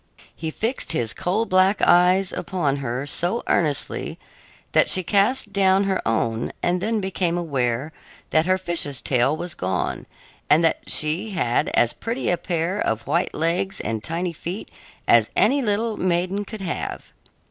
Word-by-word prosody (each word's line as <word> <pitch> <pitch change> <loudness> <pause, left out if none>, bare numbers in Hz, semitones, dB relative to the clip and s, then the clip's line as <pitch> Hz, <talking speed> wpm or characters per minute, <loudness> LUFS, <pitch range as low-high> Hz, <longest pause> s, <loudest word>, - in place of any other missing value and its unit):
He 160 - -4
fixed 225 - -2
his 120 -8 -1
coal 205 +6 -1
black 185 0 +3
eyes 180 +2 +4
upon 160 -8 -1
her 130 0 -3
so 175 +9 0
earnestly 150 -5 0 0.5
that - - +4
she 185 - +3
cast 205 +4 +2
down 195 -1 +3
her 195 -1 0
own 115 0 0
and 180 +1 +1
then 220 +1 0
became 180 -2 -1
aware 135 -4 -1 0.4
that 160 +2 +3
her 185 0 +3
fish's 170 -7 -2
tail 135 +3 +1
was 175 0 -5
gone 90 0 -3 0.4
and 155 +3 +5
that 165 - +2
she 160 +8 +2
had 120 -8 +1
as 120 - +3
pretty 235 0 -2
a 175 - +1
pair 175 +3 -2
of 110 +1 -1
white 170 +6 0
legs 170 +4 -1
and 110 -1 -3
tiny 170 +2 -2
feet 175 +5 -6 0.4
as - - +5
any 280 +1 +3
little 220 -1 0
maiden 185 +3 0
could 220 0 -8
have. 185 - -5
175 Hz, 160 wpm, -23 LUFS, 150-195 Hz, 0.5 s, and